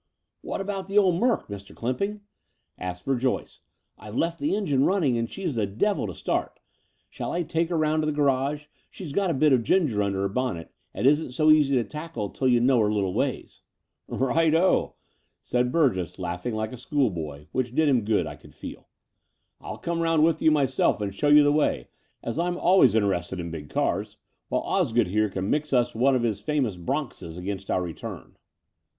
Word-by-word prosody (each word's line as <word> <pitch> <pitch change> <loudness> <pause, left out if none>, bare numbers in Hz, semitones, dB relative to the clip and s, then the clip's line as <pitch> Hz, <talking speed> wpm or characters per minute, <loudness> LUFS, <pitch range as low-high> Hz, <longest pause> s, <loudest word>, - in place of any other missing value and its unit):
"What - - -4
about 195 -1 -4
the 200 +1 -1
old 185 -4 +4
Merc, 245 0 +1
Mr. 100 -1 -9
Clymping?*' 200 - -2 0.5
asked 90 -1 -6
Verjoyce. 130 -1 -1 0.4
"I've 105 +1 -9
left 165 +4 0
the 295 - 0
engine 145 -11 +1
running 165 -10 +2
as 115 0 -1
she's 185 -6 -4
the 110 -4 0
devil 195 - 0
to - - -7
start. - - -2 0.5
Shall - - -5
I 175 - -1
take 165 +1 -1
her 170 - 0
round 155 0 +2
to 155 - -1
the - - +1
garage, 145 0 +1
as - - -29 0.2
she's 165 -7 -8
got 195 +1 +1
a - - +1
bit 145 +1 +4
of 125 - +4
ginger 140 - +1
tmder 100 -1 +1
her 100 0 0
bonnet 105 -6 -3 0.2
and - - -3
isn't 145 -1 +3
so 155 +3 +4
easy 145 -3 +4
to 120 - +2
tackle 150 - -6
till 130 - -1
you 120 -1 +4
know 125 +1 +3
her 105 -1 +2
little 100 -3 0
wa}^?" - - -3 0.5
"Right 155 +5 +2
oh," 180 +3 +2 0.5
said 125 0 0
Bvirgess, 120 - +1
laughing 90 +5 -4
like 110 0 -2
a - - -7
school 130 -1 0
boy, 75 -4 -7
which 125 -1 -2
did 160 -1 +3
him 130 -4 +3
good, 105 0 +1
I - - -7
could - - -18
fed. - - -8 0.8
"I'll - - -7
come 170 0 -3
round 165 -2 +3
with 165 0 +2
you - - +5
myself 135 -7 +2
and 100 -2 -3
show 145 +9 -1
you 150 0 +7
the 145 - +4
way, 150 0 0 0.3
as 115 +7 -3
I'm 175 +1 0
always 175 - +5
interested 95 -4 0
in 85 -1 -5
big 75 -3 -7
cars, - - -1 0.3
while - - 0
Osgood 115 -4 +1
here 105 +2 +1
can 95 +1 -3
mix 150 0 -1
us 125 -2 +2
one 130 +4 +3
of 125 - 0
his 105 -4 -1
famous 130 -4 0
bronxes 90 - -4
against 95 +1 -5
our 90 - +1
retvim." 85 -2 -7
130 Hz, 205 wpm, -26 LUFS, 105-155 Hz, 0.8 s, you